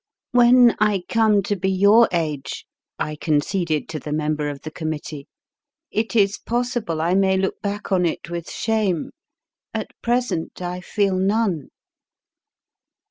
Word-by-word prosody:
When 245 Hz, 0 st, +6 dB
I 210 Hz, -3 st, +2 dB
come 215 Hz, -3 st, +3 dB
to 205 Hz, +2 st, -1 dB
be 190 Hz, 0 st, -1 dB
your 200 Hz, +5 st, +5 dB
age, 155 Hz, -5 st, -3 dB, 0.3 s
1 150 Hz, 0 st, -3 dB
conceded 155 Hz, 0 st, 0 dB
to 160 Hz, -1 st, -4 dB
the 150 Hz, -, -7 dB
member 150 Hz, -1 st, -1 dB
of 140 Hz, -2 st, -7 dB
the 155 Hz, -, -7 dB
committee, 155 Hz, -2 st, -5 dB, 0.6 s
it 220 Hz, +2 st, -1 dB
is 200 Hz, -2 st, +3 dB
possible 240 Hz, -8 st, -2 dB
I 170 Hz, +3 st, +1 dB
may 190 Hz, 0 st, +3 dB
look 190 Hz, 0 st, -2 dB
back 205 Hz, +1 st, -4 dB
on 180 Hz, -2 st, +3 dB
it 165 Hz, -, -4 dB
with 170 Hz, -1 st, -5 dB
shame. 215 Hz, -7 st, -1 dB, 0.6 s
At -, -, -3 dB
present 240 Hz, -9 st, -1 dB
I 180 Hz, 0 st, -4 dB
feel 200 Hz, +1 st, 0 dB
none. 195 Hz, -5 st, 0 dB
190 Hz, 140 wpm, -22 LUFS, 160-215 Hz, 0.6 s, When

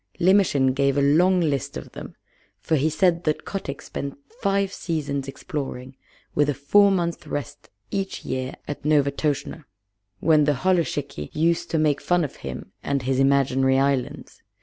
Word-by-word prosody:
Limmershin 170 Hz, -8 st, +4 dB
gave 140 Hz, 0 st, +1 dB
a -, -, +3 dB
long 175 Hz, +6 st, +4 dB
list 145 Hz, -5 st, -1 dB
of -, -, -9 dB
them, -, -, -9 dB, 0.4 s
for 160 Hz, -, 0 dB
he 155 Hz, +2 st, +2 dB
said 170 Hz, +2 st, +2 dB
that 155 Hz, -1 st, -1 dB
Kotick 145 Hz, -8 st, -5 dB
spent 140 Hz, -1 st, -6 dB, 0.2 s
five 195 Hz, 0 st, +1 dB
seasons 140 Hz, -5 st, -3 dB
exploring, 135 Hz, -2 st, -6 dB, 0.4 s
with 145 Hz, 0 st, +2 dB
a 145 Hz, -, 0 dB
four 200 Hz, +10 st, +4 dB
months' 175 Hz, -3 st, -1 dB
rest 145 Hz, -5 st, -6 dB, 0.2 s
each 195 Hz, -1 st, -3 dB
year 130 Hz, 0 st, -3 dB
at 145 Hz, -, -6 dB
Novastoshnah, 145 Hz, +1 st, 0 dB, 0.6 s
when 155 Hz, -2 st, +4 dB
the 145 Hz, -, +3 dB
holluschickie 145 Hz, -, -1 dB
used 165 Hz, +2 st, +1 dB
to 165 Hz, -, 0 dB
make 155 Hz, -2 st, +2 dB
fun 175 Hz, -1 st, +2 dB
of 145 Hz, -, -5 dB
him 65 Hz, -1 st, -7 dB
and 140 Hz, -2 st, -1 dB
his 130 Hz, +1 st, 0 dB
imaginary 135 Hz, -1 st, +3 dB
islands. 135 Hz, -2 st, -1 dB
145 Hz, 155 wpm, -24 LUFS, 135-170 Hz, 0.6 s, Limmershin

